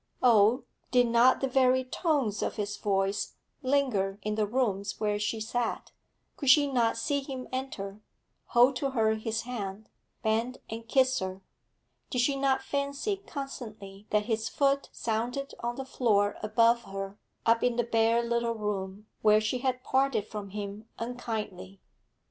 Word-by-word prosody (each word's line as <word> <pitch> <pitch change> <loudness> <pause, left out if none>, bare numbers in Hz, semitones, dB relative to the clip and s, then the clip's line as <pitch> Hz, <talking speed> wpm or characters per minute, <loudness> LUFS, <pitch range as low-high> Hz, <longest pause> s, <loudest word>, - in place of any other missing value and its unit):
Oh, 230 +1 +5 0.3
did 245 -1 +4
not 235 +2 +4
the 270 - +1
very 260 0 +3
tones 255 - 0
of - - -1
his 205 -1 -3
voice 195 0 -1 0.3
linger 255 -8 +1
in 215 - -1
the 210 -1 0
rooms 200 -4 -1
where 210 -1 0
she 210 +2 -1
sat? 230 +1 -2 0.5
Could 280 - 0
she 290 +2 +7
not 240 -5 +1
see 280 +5 0
him 270 -2 -6
enter, 215 -6 -5 0.4
hold 245 +3 +5
to 275 +1 -1
her 220 -4 +2
his 220 0 -2
hand, 215 -4 -5 0.3
bend 225 +4 0
and 225 0 -6
kiss 260 +1 +3
her? 190 0 -5 0.7
Did 250 - +1
she 275 +3 +2
not 270 -1 +1
fancy 280 +8 -1
constantly 215 -8 -7
that 210 0 +2
his 225 -1 -1
foot 280 0 +1
sounded 240 +5 -2
on 240 0 -2
the 270 - -5
floor 210 -6 +2
above 230 +2 +3
her, 195 +1 -6 0.3
up 230 0 +4
in 245 -1 +2
the 240 - +2
bare 230 0 +2
little 235 0 0
room, 205 -1 -4 0.2
where 215 0 +6
she 215 +4 -1
had 255 0 -1
parted 265 -6 +1
from 210 -2 -6
him 205 +2 -6
unkindly? 220 -5 -5
230 Hz, 155 wpm, -29 LUFS, 210-255 Hz, 0.7 s, she